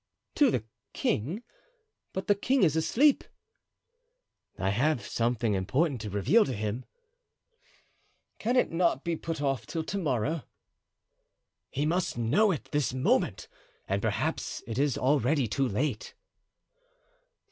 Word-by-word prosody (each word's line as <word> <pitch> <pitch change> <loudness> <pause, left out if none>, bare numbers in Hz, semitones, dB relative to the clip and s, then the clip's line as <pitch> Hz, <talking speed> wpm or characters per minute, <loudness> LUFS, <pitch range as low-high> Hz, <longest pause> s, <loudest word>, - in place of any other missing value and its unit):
"To 290 -3 +4
the 120 - 0 0.3
king! 160 - -1 0.7
but 190 - -4
the 205 - +4
king 255 +6 +1
is 160 -4 +4
asleep." 265 - +3 1.3
"I 95 0 0
have 130 +5 +1
something 115 -2 0
important 125 - 0
to 105 - -5
reveal 105 - +4
to 130 - -3
him." 110 +4 -3 1.5
"Can 240 +4 0
it 250 - +3
not 165 -5 +1
be 170 -1 -1
put 160 -2 -4
off 135 -5 -1
till 160 - -3
to 200 +5 -3
morrow?" 150 - 0 1.3
"He 145 +2 -1
must 170 -3 0
know 145 - +3
it 165 -7 -3
this 145 -3 0
moment, 130 - +1 0.4
and 100 +1 0
perhaps - - -2
it 115 +2 -4
is 140 -2 +2
already 140 0 +2
too 135 +6 0
late." 120 +2 -2
140 Hz, 130 wpm, -29 LUFS, 115-170 Hz, 1.5 s, To